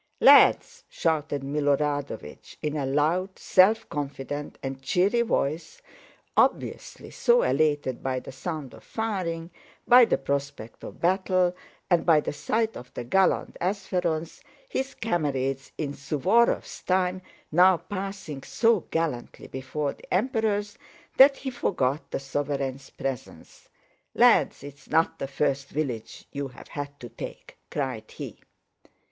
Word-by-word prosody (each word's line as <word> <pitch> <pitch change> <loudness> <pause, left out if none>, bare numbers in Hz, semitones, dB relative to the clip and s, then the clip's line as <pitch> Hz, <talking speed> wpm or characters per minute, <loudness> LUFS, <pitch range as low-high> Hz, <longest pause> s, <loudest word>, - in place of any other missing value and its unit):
"Lads!" 485 0 +6
shouted 150 -4 -1
Milorádovich 145 - -2
in 150 0 -1
a 140 -3 -1
loud, 165 +7 +1
self 215 +4 +4
confident, 145 0 -5
and 135 0 -5
cheery 190 - +2
voice, 170 - -1 0.6
obviously - - 0
so 485 +1 +3
elated 145 -4 +1
by 130 -1 -1
the - - -10
sound 145 -1 -5
of - - -14
firing, 180 -7 -3 0.4
by 245 0 +9
the - - +1
prospect 140 -5 -4
of - - -9
battle, 185 0 +2 0.3
and 175 -3 +3
by 160 -3 +5
the 150 - -3
sight 220 +9 -1
of 125 +1 -10
the - - -4
gallant 190 +10 +2
Ápsherons, 180 -4 -2 0.3
his 270 - -3
comrades 135 - -1
in 145 -3 -3
Suvórov's 180 - +1
time, 185 0 +1 0.3
now 180 +3 +6
passing 195 -7 -6
so 225 - +2
gallantly 160 -7 -3
before 140 +2 -3
the - - -18
Emperors, 210 -1 0 0.4
that 275 +1 +8
he 265 - -4
forgot 145 - -1
the - - -2
sovereigns' 135 -1 -3
presence. 135 -3 -7 0.5
"Lads, - - +4
it's 140 0 -12
not 160 +1 +2
the 135 - -3
first 140 0 -1
village 130 -7 -4
you've 140 -2 -5
had 145 0 -7
to 120 - -8
take," - - -9
cried 130 -7 -3
he. - - -8
155 Hz, 130 wpm, -26 LUFS, 140-190 Hz, 0.6 s, by